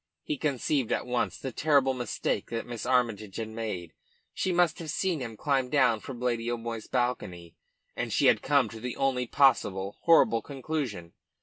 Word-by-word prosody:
He - - -2
conceived 140 -2 0
at - - 0
once 125 -1 -1
the 135 - -5
terrible 140 0 +3
mistake 125 -3 -2
that 115 -1 -3
Miss 120 -3 -6
Armytage 115 -6 +1
had 110 -1 -4
made. 110 -7 -5 0.4
She 190 - -1
must 175 -2 +2
have 165 -2 -6
seen 175 +1 0
him 115 -4 -6
climb 135 -2 0
down 125 -5 +3
from 125 +1 -8
Lady 120 -1 -1
O'Moy's 115 -2 -4
balcony, 90 -9 -2 0.4
and - - -3
she - - +2
had - - +5
come 140 -4 +3
to 115 - -9
the 125 +1 -5
only 130 -2 0
possible, 100 -9 +2
horrible 160 -9 +5
conclusion. 135 - -4
125 Hz, 175 wpm, -28 LUFS, 115-140 Hz, 0.4 s, had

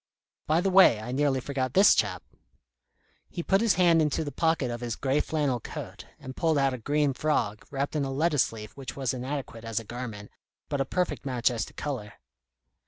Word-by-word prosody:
By 160 +3 +3
the 195 +1 0
way, 185 - +7
I 110 +3 -6
nearly 135 0 +1
forgot 130 -1 -3
this 195 +2 +7
chap." - - 0 1.1
He 170 - -5
put 195 +3 +2
his 230 -3 +3
hand 170 -3 +4
into 150 0 0
the 145 - -5
pocket 160 -7 0
of 120 0 -5
his 120 -2 -3
grey 135 +2 0
flannel 145 -6 0
coat, - - -8
and 130 0 -9
pulled 160 -2 +1
out 135 -1 +2
a 130 - -5
green 145 +3 +1
frog, 120 -8 -1
wrapped 140 +2 -3
in 150 - +1
a 135 - -2
lettuce 145 0 +2
leaf 110 -1 -9
which 135 -2 -7
was 135 -3 -1
inadequate 130 -2 -5
as 115 -1 -2
a - - -8
garment, 110 -3 -7 0.4
but 140 - -1
a - - +1
perfect 180 +3 -2
match 125 -2 +1
as 115 -2 -2
to - - -14
colour. 125 -9 -5
135 Hz, 205 wpm, -27 LUFS, 120-155 Hz, 1.1 s, way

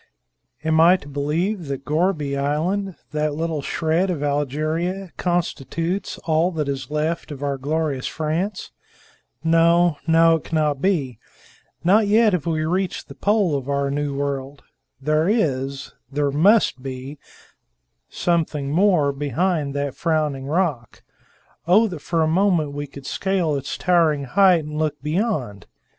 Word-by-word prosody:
"Am 160 0 +2
I 175 +3 +6
to 145 - -14
believe 155 +6 -2
that 140 0 -5
Gourbi 155 -2 0
Island, 165 +8 -1 0.2
that 150 -1 -1
little 160 -1 -2
shred 165 +6 0
of 160 -5 -2
Algeria, 155 +6 -1
constitutes 175 +1 -2
all 160 +2 +2
that 150 -3 -2
is 135 -2 -4
left 155 +3 -2
of 145 -1 -7
our 140 -1 0
glorious 145 -1 -1
France? 170 +6 -3 0.7
No, 165 0 +4
no; 165 0 +5
it - - -13
cannot 150 -4 0
be. 145 - 0 0.6
Not 205 +5 +4
yet 215 0 +4
have 175 -3 -1
we 155 -1 0
reached 185 +3 -2
the - - -8
pole 200 -7 +1
of 135 -1 -4
our 140 0 0
new 145 -1 -2
world. 140 0 -4 0.4
There 155 +5 +1
is 140 - -1 0.2
there 145 0 0
must 180 - +3
be 135 +2 -7 0.9
something 155 -5 -1
more 170 -4 +3
behind 145 +2 -1
that 140 -1 -2
frowning 150 -5 -1
rock. 150 - -2 0.6
Oh, 210 +6 +5
that 175 -6 -6
for 165 +2 0
a - - +2
moment 170 -3 +2
we 145 0 -5
could 140 -1 -12
scale 190 -5 0
its 140 -1 -4
towering 165 -5 +2
height 180 +2 +4
and 150 0 -5
look 150 -2 -1
beyond! 150 - -2
155 Hz, 145 wpm, -22 LUFS, 140-175 Hz, 0.9 s, I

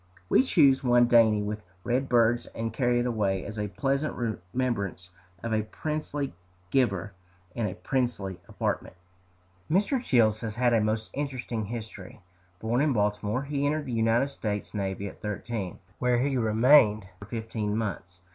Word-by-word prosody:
We - - +6
choose 145 - +4
one 120 -1 +5
dainty 115 -3 +5
with 105 +1 -4 0.2
red 125 +3 0
birds, 120 -1 +3
and 115 0 -3
carry 120 -2 +2
it - - -1
away 105 -6 0
as 105 +2 -6
a 105 - -1
pleasant 135 +7 -1 0.4
remembrance 100 -8 -2 0.3
of 115 -1 -2
a 110 - +2
princely 145 +4 -4 0.4
giver, 100 -7 +1 0.4
in 115 -3 -1
a 95 - -5
princely 105 -8 -2
apartment. - - -3 0.7
Mr. 205 - +2
Childs 110 - +3
has 110 -3 -4
had 120 -1 +2
a 115 - +4
most 110 +1 -1
interesting 130 -6 -3
history. 110 -4 -8 0.4
Born 115 +4 0
in 150 -2 +2
Baltimore, 105 +3 0
he 140 0 -2
entered 150 0 -1
the 125 - -4
United 115 +4 +2
States 105 -6 -4
navy 100 -1 -3
at - - -11
thirteen, 105 -2 -4 0.2
where 125 -1 +2
he 135 +2 +1
remained 110 -2 +5
for 100 - -9
fifteen 110 -1 -3
months. 90 -5 -4
115 Hz, 155 wpm, -28 LUFS, 105-130 Hz, 0.7 s, We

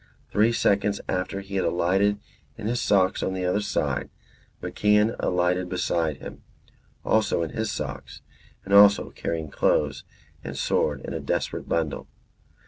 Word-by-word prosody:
Three 110 +3 +3
seconds 100 -2 +1
after 95 +2 -2
he 100 0 -5
had 95 - +1
alighted 95 +4 +2 0.4
in - - -7
his 120 +2 0
socks 95 -2 +2
on 95 - -1
the 90 -1 -2
other 90 +4 +1
side, 105 - -1 0.5
MacIan 105 +2 +2
alighted 90 0 0
beside 85 -4 -1
him, - - -10 0.6
also 110 -6 +2
in 80 - -4
his 110 -1 -2
socks 70 -2 -6 0.4
and 100 - -3
also 100 0 +6
carrying 80 -3 -4
clothes 75 -2 +1 0.4
and - - -6
sword - - 0
in - - -6
a - - -3
desperate - - -3
bundle. 80 -3 -1
95 Hz, 145 wpm, -25 LUFS, 85-105 Hz, 0.6 s, also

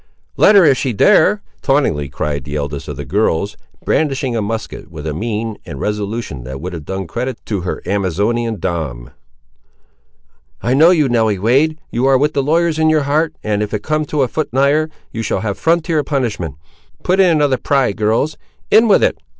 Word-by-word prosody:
"Let 210 - +5
her 195 -4 +7
if 135 -4 +4
she 130 -4 -1
dare!" 205 - +4 0.2
tauntingly 110 - +1
cried 75 0 -3
the 75 +1 -6
eldest 70 -1 -4
of 75 -3 -6
the 70 - -6
girls, 100 - 0 0.3
brandishing 135 -5 0
a 115 - 0
musket 110 -7 -5
with 80 -2 -9
a 75 - -2
mien 110 +4 -3
and 70 - -8
resolution 105 - -3
that 65 +2 -7
would 90 +2 -6
have 80 -4 -7
done 95 +2 -4
credit 120 +8 -4
to 100 -4 -2
her 90 - -4
Amazonian 105 +4 -1
dam. 80 -10 -4 1.5
"I 120 - 0
know 155 +5 +6
you, 160 -6 +3
Nelly 110 -4 +1
Wade; 135 +10 +2
you 125 +3 +1
are 135 -1 +5
with 150 +3 +1
the 140 - +1
lawyers 160 +3 +1
in 160 0 +4
your 155 -2 +2
heart, 155 +3 0
and 105 -1 0
if 105 0 -3
you - - +2
come 155 +7 -2
a 140 -4 +2
foot 155 +5 -3
nigher, 140 +5 +2 0.2
you 115 - -4
shall 100 -3 -1
have 100 -1 -2
frontier 165 -2 +1
punishment. 110 - -2 0.5
Put 185 +2 +1
in 190 -2 +6
another 145 -5 +2
pry, 135 -2 +1
girls; 110 +9 0 0.3
in 225 +2 +6
with 205 - +4
it! - - +1
115 Hz, 190 wpm, -17 LUFS, 95-150 Hz, 1.5 s, her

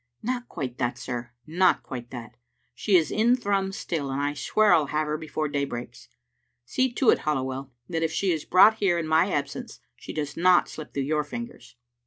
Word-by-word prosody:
"Not 245 +1 -3
quite 125 -3 -5
that, 120 -1 -1
sir, 120 -1 -5 0.2
not 180 +3 +2
quite 120 -3 -7
that. 120 -1 -9 0.4
She 190 - +1
is 160 -4 +3
in 235 +3 +3
Thrums 195 -5 -1
still, 150 -5 -3
and 135 +1 -2
I 145 0 0
swear 205 - +3
I'll 155 -4 +3
have 155 +2 0
her 150 0 -2
before 155 0 -3
day 145 -1 -1
breaks. 120 -3 -7 0.6
See 255 - 0
to 250 -1 +4
it, - - +2
Halliwell, 135 -2 -2 0.2
that 165 -2 -2
if 165 -1 0
she 190 +2 0
is 160 -3 -1
brought 210 +4 +6
here 190 -5 +2
in 170 - -2
my 160 +5 +3
absence 145 - -4 0.2
she - - -9
does 150 -2 -4
not 180 +1 +4
slip 155 -2 -9
through 140 - 0
your 150 +2 0
fingers." 145 - -8
155 Hz, 205 wpm, -26 LUFS, 135-190 Hz, 0.6 s, brought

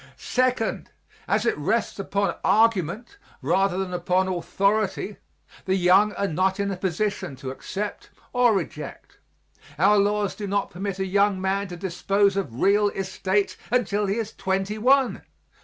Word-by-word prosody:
Second, 255 -3 0 0.4
as 210 +3 +1
it - - +2
rests 205 +8 -1
upon 200 0 0
argument 225 - +1 0.2
rather 180 +5 +2
than 190 -1 -3
upon 180 +1 +1
authority, 195 +3 0 0.5
the 190 - +1
young 190 +3 +4
are 200 - -1
not 190 +3 0
in 200 0 0
a - - -2
position 190 -4 -2
to 130 0 -6
accept 200 +9 -5 0.2
or 245 -3 +4
reject. 160 -4 -6 0.6
Our 200 +5 +5
laws 205 0 +1
do 205 - -6
not 200 +1 -1
permit 195 +1 -4
a 190 - -1
young 200 0 +2
man 195 +1 -1
to 175 -1 -8
dispose 195 +3 +1
of 135 -12 -3
real 205 +1 +4
estate 195 +1 -1
until 210 -4 +1
he 195 - 0
is 225 -1 -3
twenty 195 +3 -2
one. 265 +3 +3
195 Hz, 150 wpm, -24 LUFS, 185-210 Hz, 0.6 s, Our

